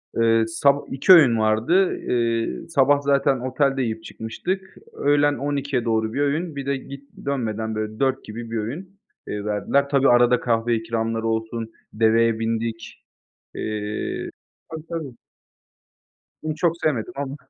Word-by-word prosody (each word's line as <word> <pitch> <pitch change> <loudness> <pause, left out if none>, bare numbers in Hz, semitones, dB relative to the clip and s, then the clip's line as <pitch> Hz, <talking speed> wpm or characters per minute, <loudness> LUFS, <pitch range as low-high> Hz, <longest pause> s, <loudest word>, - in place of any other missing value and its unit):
Iıı, 115 -1 +3
sab 140 +5 +3
2 140 +8 +6
öğün 130 -10 +7
vardı. 115 - +2
Iıı, 115 +3 -1
sabah 145 -2 +3
zaten 140 -1 +2
otelde 135 +2 0
yiyip 110 -2 -3
çıkmıştık. 185 +16 -5 0.2
Öğlen 145 0 +2
12’ye 140 -3 -2
doğru 110 -1 0
1 140 - -1
öğün. 150 +3 -1
Bir 140 - -5
de 140 0 0
git 140 +1 -11 0.2
dönmeden, 110 -5 -2
böyle, 110 0 -4
4 135 -1 +1
gibi 115 +1 -8
1 115 - -2
öğün, 175 - -6 0.3
iii, 105 0 -4
verdiler. 105 +7 +1
Tabii, 140 -1 +3
arada 120 0 +5
kahve 115 0 +1
ikramları 115 0 -2
olsun, 115 0 -3 0.2
deveye 115 +1 +3
bindik. 115 0 -3 0.5
Eee 105 0 -4 0.4
Tabii, 160 -1 -7
tabii. 160 -6 -5 1.3
Onu 155 -1 -2
çok 165 0 +1
sevmedim 150 +2 0
ama. 140 0 -4
120 Hz, 140 wpm, -23 LUFS, 115-140 Hz, 1.3 s, öğün